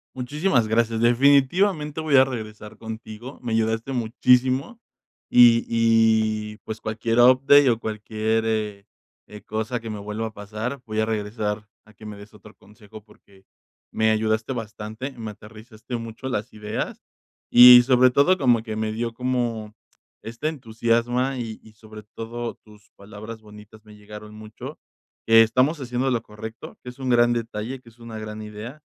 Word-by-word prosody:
Muchísimas 130 - 0
gracias, 115 0 +1
definitivamente 145 - +2
voy 155 -3 +3
a 130 - +7
regresar 110 -4 -8
contigo, 110 +2 -9
me 120 -3 -4
ayudaste 115 +3 -1
muchísimo 125 - +1 0.5
y 120 -1 +6
y 110 -2 +2
pues 110 0 -7
cualquier 115 +2 -1
update 130 +3 +6
o 115 -2 +1
cualquier, 110 0 -2
eh 105 -3 -3 0.4
eh, 105 0 -12
cosa 110 +3 -3
que 115 0 -8
me 105 -1 -5
vuelva 105 +2 -5
a 110 - -11
pasar, 110 +6 -6
voy 110 -1 -3
a 110 - +2
regresar 105 -1 -3 0.2
a 110 - -20
que 110 - -15
me 105 -1 -8
des 100 +2 -14
otro 105 0 -16
consejo 105 0 -16
porque 100 -2 -23 0.5
me 110 0 +2
ayudaste 110 +2 0
bastante, 110 +2 -6
me 115 -4 -7
aterrizaste 110 +3 -11
mucho 115 +2 -7
las 110 -5 -3
ideas, 105 0 -5 0.5
y 125 0 +10
sobre 130 0 +4
todo 160 +9 +3
como 125 -7 +3
que 110 -2 -6
me 110 0 -2
dio 115 +1 -3
como 120 -3 -2 0.5
este 120 +7 -4
entusiasma 120 0 -1
y 115 -2 -6
y 110 - -16
sobre 110 0 -13
todo 115 +2 -7
tus 105 -1 -21
palabras 105 +3 -10
bonitas 105 0 -16
me 105 0 -15
llegaron 105 +1 -12
mucho. 110 0 -10 0.5
Que 115 0 +7
estamos 130 +8 +1
haciendo 125 0 -2
lo 120 -2 0
correcto, 110 +2 -10
que 125 - -8
es 125 - -13
un 130 -1 -3
gran 120 -1 +4
detalle, 115 +2 -4
que 125 - -27
es 115 +1 -25
una 115 -1 -9
gran 110 0 -7
idea, 105 +7 -9
115 Hz, 160 wpm, -23 LUFS, 110-125 Hz, 0.5 s, y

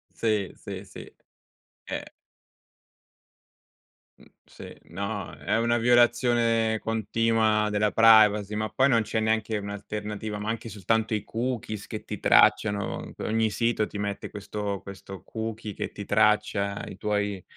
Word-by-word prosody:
Sì, 105 -4 0
sì, 100 0 -8
sì, 95 - -12 0.7
eh. - - -4 2.2
Mhmm, - - -19 0.2
sì, - - -12 0.2
no, 100 +4 -4
è - - 0
una 120 +1 +2
violazione 120 -2 +3
continua 110 -1 +1
della 105 -1 +1
privacy, 105 -2 +6
ma 110 0 -1
poi 135 +5 +2
non 115 -3 +4
c'è 110 +1 -2
neanche 110 0 0
un'alternativa, 105 +1 -5
ma 105 +2 -3
anche 115 0 -4
soltanto 110 +2 0
i 105 -1 -2
cookies 115 -3 -4
che - - -7
ti - - -6
tracciano. 100 -2 +3
Ogni 110 0 +1
sito 115 -1 0
ti 105 - -8
mette 100 -1 -3
questo 100 -1 -4
questo 95 -1 -10
cookie 110 -1 -5
che - - -5
ti 100 - -7
traccia 105 -1 +1
i 95 - -9
tuoi 105 -2 -1
110 Hz, 135 wpm, -26 LUFS, 105-115 Hz, 2.2 s, privacy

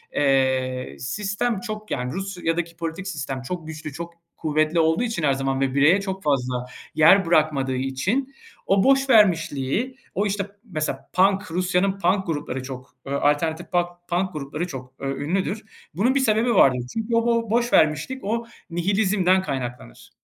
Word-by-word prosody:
eee, 130 -2 +1
sistem 205 - -1
çok 215 -1 -7
Yani, 125 +1 -2
Rusya'daki 175 -3 -3
politik 170 +3 -4
sistem 140 -6 -4
çok 160 +4 -5
güçlü, 155 -2 -7
çok 170 +2 -7 0.2
kuvvetli 155 +1 +1
olduğu 160 +6 +3
için 230 -9 -2
her 140 -2 +3
zaman 135 0 -1
ve 135 -1 +1
bireye 155 +8 +5
çok 190 -2 -5
fazla 125 -4 0 0.3
yer 180 +5 +6
bırakmadığı 150 -5 +2
için 180 - -1 0.3
o 195 0 +3
boşvermişliği, 220 - +3 0.2
o, 205 - +1
işte 200 -1 -1 0.2
Mesela 155 -9 -4
punk 195 0 +2
Rusya'nın 185 +2 +1
punk 190 +2 +2
grupları 145 -5 -3
çok, 130 0 -9
ııı, 140 0 -2
alternatif 160 +3 0
pak 175 0 -2
punk 180 +1 0
grupları 150 +4 -4
çok, 130 -3 -8
ööö, 135 0 -3
ünlüdür. 190 +7 -1 0.3
Bunun 235 - +2
bir 275 - +4
sebebi 230 -1 +2
vardır. 130 -7 +5
Çünkü 225 +1 -1
o 230 0 +2
bo 230 -2 +1
boşvermişlik, 235 - +2
o 230 +3 -1 0.2
nihilizmden 185 +1 +2
kaynaklanır. 125 - -6
170 Hz, 150 wpm, -23 LUFS, 140-200 Hz, 0.3 s, yer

